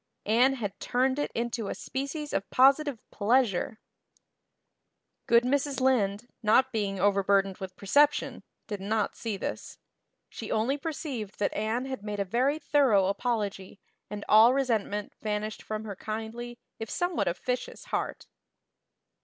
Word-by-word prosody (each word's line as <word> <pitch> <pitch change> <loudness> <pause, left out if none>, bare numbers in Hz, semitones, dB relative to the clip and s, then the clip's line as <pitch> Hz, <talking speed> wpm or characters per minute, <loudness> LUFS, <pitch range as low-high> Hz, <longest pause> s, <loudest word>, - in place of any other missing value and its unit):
Anne 245 +5 +4
had 205 -6 -5
turned 260 +3 +1
it 290 - -1
into 235 -2 -2
a - - -3
species 280 +3 -4
of 195 - -1
positive 275 +1 +4
pleasure. 220 -2 +1 1.5
Good 235 0 +5
Mrs. 280 +2 0
Lynde, 240 -4 +1
not 250 +4 +4
being 200 -4 -2
overburdened 195 0 +2
with 190 -1 -7
perception, 285 +11 +2 0.2
did 205 -3 -5
not 210 +1 -1
see 220 -4 -4
this. - - -5 0.5
She 220 - -7
only 230 +6 +1
perceived 275 - -5
that 205 - 0
Anne 220 +4 -1
had 265 -5 -5
made 210 -1 -4
a 200 - 0
very 255 +9 +1
thorough 275 -10 +3
apology 200 -3 -2 0.3
and 205 -1 -6
all 225 +4 +7
resentment 220 -6 -1
vanished 215 0 -3
from 215 0 -5
her 205 -2 -6
kindly, 225 +4 -6 0.2
if 225 -1 -5
somewhat 355 -1 -1
officious, 250 +8 -3
heart. - - -3
225 Hz, 135 wpm, -28 LUFS, 205-260 Hz, 1.5 s, all